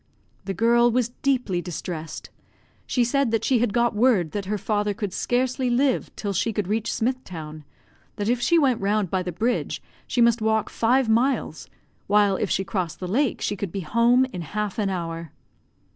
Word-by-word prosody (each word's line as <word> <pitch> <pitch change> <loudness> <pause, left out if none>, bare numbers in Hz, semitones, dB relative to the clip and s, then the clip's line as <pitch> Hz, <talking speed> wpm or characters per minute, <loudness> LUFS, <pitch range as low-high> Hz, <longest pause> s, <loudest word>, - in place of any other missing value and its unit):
The 195 0 -3
girl 235 +4 +4
was 245 0 +1
deeply 250 -10 +1
distressed. 160 -2 -6 0.6
She 250 - +2
said 275 +2 +1
that 225 -1 0
she 255 -3 +3
had 240 -2 +1
got 235 0 +1
word 210 -8 +3
that 205 -2 -3
her 210 +2 -1
father 205 0 -1
could 205 -4 -4
scarcely 255 +1 0
live 255 +2 +1
till 205 -2 -3
she 195 +5 0
could 205 -3 -2
reach 220 +2 -1
Smith 255 +3 -1
town; 155 -3 -8 0.5
that 205 - -3
if 240 +1 +1
she 340 +7 +3
went 265 -8 +2
round 200 -2 0
by 190 - +1
the 180 0 -4
bridge, 230 +8 -1 0.3
she 245 - -2
must 235 -1 +4
walk 220 0 +1
five 250 +2 +2
miles, 245 +5 0 0.4
while 205 -1 +4
if - - -1
she 195 - +1
crossed 185 -4 -3
the 185 - -4
lake 255 +7 0
she 205 - -1
could 200 -3 -4
be 195 - -3
home 235 +8 +3
in 180 - -4
half 210 +5 -3
an 205 -2 +1
hour. 165 -4 -4
215 Hz, 190 wpm, -24 LUFS, 190-240 Hz, 0.6 s, girl